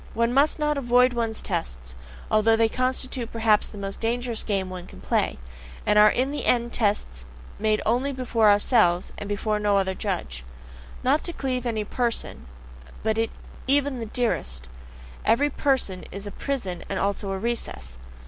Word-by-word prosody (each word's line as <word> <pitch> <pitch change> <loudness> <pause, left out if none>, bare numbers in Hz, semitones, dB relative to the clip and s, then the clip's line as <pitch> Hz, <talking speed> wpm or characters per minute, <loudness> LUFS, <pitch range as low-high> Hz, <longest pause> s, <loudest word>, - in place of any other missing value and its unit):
One 235 +1 +2
must 280 +3 +3
not 300 -2 +1
avoid 250 0 +4
one's 225 -2 -2
tests, 65 - -3 0.4
although 220 +1 +4
they 225 0 +4
constitute 255 0 -2
perhaps 220 -2 +3
the 210 - -11
most 195 0 -5
dangerous 235 0 -1
game 195 -3 -1
one 180 -1 -7
can - - -13
play, 65 - 0 0.5
and 210 0 +4
are 210 0 +8
in 260 +5 0
the 295 - -3
end 240 -1 +2
tests 200 - -1 0.3
made 215 0 +1
only 250 +5 +1
before 245 -5 +2
ourselves 205 -4 +3
and 205 - -6
before 210 +1 0
no 205 -1 +2
other 190 -1 +1
judge. 175 - -3 0.6
Not 275 +4 +3
to 345 - -2
cleave 255 -4 -2
to 245 - -2
any 220 -2 -1
person, 235 - -3 0.6
be 220 - +2
it 225 +1 0 0.4
even 280 -1 +2
the 225 - -4
dearest 65 - -2 0.5
every 285 +6 +3
person 260 -11 0
is 200 +1 -6
a 205 - -5
prison 195 -12 -3
and 195 - -2
also 200 +1 -1
a 195 - -1
recess. 65 - -4
225 Hz, 170 wpm, -25 LUFS, 195-250 Hz, 0.6 s, are